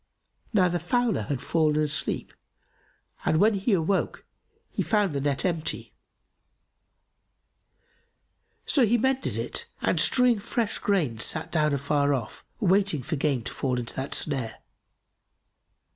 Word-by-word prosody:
Now 190 -5 +4
the 175 0 -1
fowler 245 - +1
had 140 -2 -2
fallen 155 -1 +2
asleep 150 -2 -1 0.9
and, 155 - +2
when 215 +6 +4
he 200 +3 0
awoke, 185 +2 0 0.5
he - - -2
found 205 -6 +1
the 140 - -2
net 140 +2 -1
empty; 170 -3 -3 2.7
so 275 - +4
he 235 +1 +3
mended 265 +3 0
it - - -3
and - - +1
strewing 250 -3 +3
fresh 225 +1 -2
grain 155 - 0
sat 155 +6 +1
down 150 -2 +2
afar 140 +1 +1
off, 115 -5 -6 0.2
waiting 195 - +2
for 155 - -2
game 140 -4 0
to - - -6
fall 130 -2 -1
into 120 -1 -5
that 130 +1 -2
snare. 130 -7 -1
160 Hz, 130 wpm, -26 LUFS, 140-205 Hz, 2.7 s, Now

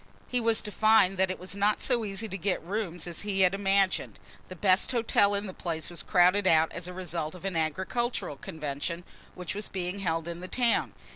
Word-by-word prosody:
He 250 - 0
was 225 -1 +2
to 210 - -5
find 215 -3 +4
that 190 0 +4
it 185 - -3
was 185 +2 -7
not 205 +1 +2
so 245 -3 0
easy 205 +1 -3
to 190 - -6
get 185 0 -1
rooms 180 -3 -2
as 175 -2 -4
he 200 -2 0
had 185 0 +5
imagined. 195 -1 +1 0.3
The 185 - -9
best 185 +4 +3
hotel 215 -4 +3
in 200 +1 -2
the 190 - -6
place 165 -2 -4
was 175 - -2
crowded 185 +2 +4
out 160 -1 +4
as 170 +1 -6
a - - -6
result 175 -3 -4
of 180 - -11
an 195 -3 -2
agricultural 185 - -1
convention 155 +3 -4 0.3
which 180 -2 -5
was 210 +1 -5
being 185 +1 -3
held 165 -3 -1
in 170 0 -5
the 180 - -7
town. 240 +2 +1
185 Hz, 215 wpm, -28 LUFS, 170-205 Hz, 0.3 s, had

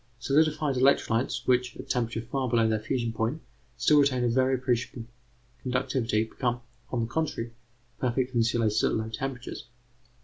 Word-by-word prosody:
Solidified 150 +1 +2
electrolytes 130 -2 +2
which, 125 -1 +1
at - - -8
temperatures 115 -2 -1
far 135 -2 0
below 115 -1 +3
their 110 -1 +1
fusion 115 +1 -2
point, 115 +7 -1 0.4
still 150 -1 +5
retain 135 -3 +3
a 120 - +2
very 130 +2 +3
appreciable 125 -2 -2 0.6
conductivity, 125 -3 0
become, 120 +1 -2 0.3
on 120 - -1
the - - 0
contrary, 125 -3 -2 0.5
perfect 125 +1 0
insulators 115 -2 +2
at - - +2
low 110 0 -2
temperatures. 125 +3 -5
125 Hz, 145 wpm, -28 LUFS, 115-130 Hz, 0.6 s, still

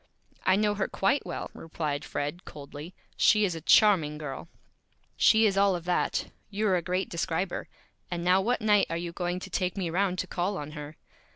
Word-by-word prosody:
"I 185 - +6
know 210 +1 +2
her 205 -1 -1
Quite 195 +9 0
Well," - - -5
replied 150 -3 -4
Fred, 150 +5 -4
coldly. 145 +4 -10 0.2
"She 210 -1 +5
is 180 - -1
a 165 - -6
Charming 165 -5 +4
Girl." 150 +1 -6 0.7
"She 220 0 +5
is 195 -2 +2
all 200 -2 +4
of 170 -1 -6
that. 180 - 0 0.2
You're 205 -1 +1
a 175 - +1
great 185 +2 -1
Describer. 175 +1 -2 0.4
And 175 -1 -3
now 180 +2 +4
what 245 +4 0
Night 210 -2 +4
are 165 - -2
you 170 0 -4
going 175 +1 -2
to - - -8
take 185 0 -1
me 175 -4 -2
around 185 +1 +1
to 185 - -1
Call 185 +2 -2
on 150 0 -6
her?" 150 0 -8
180 Hz, 195 wpm, -28 LUFS, 165-195 Hz, 0.7 s, I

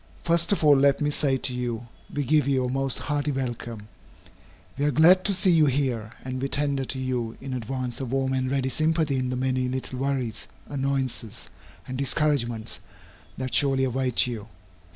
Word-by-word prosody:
First 170 +1 +2
of 200 - +1
all 150 -1 +7
let 140 0 +4
me 145 0 +1
say 140 -2 +1
to 130 - 0
you, 120 -2 -3 0.3
we 145 - -1
give 150 +2 +3
you 130 -2 +2
a - - -1
most 135 0 -1
hearty 145 0 -1
welcome. 120 -5 -4 0.9
We 145 - -1
are - - +3
glad 175 +6 +6
to 200 - +2
see 185 0 +4
you 160 -3 +5
here, 125 -5 -1
and 130 0 -4
we 135 - 0
tender 140 -2 0
to 135 - -4
you 125 -3 -2
in 135 -1 -6
advance 125 +1 -3
a - - -2
warm 130 +1 0
and 130 0 0
ready 135 -1 0
sympathy 155 0 +1
in 130 -1 -1
the 125 - -2
many 130 0 0
little 130 0 -4
worries, 130 -5 -2 0.2
annoyances, 135 -5 -3 0.4
and 130 0 -5
discouragements 120 - 0 0.6
that 130 -1 -4
surely 135 -2 +3
await 130 -1 +2
you. 115 -4 -5
130 Hz, 185 wpm, -26 LUFS, 125-145 Hz, 0.9 s, all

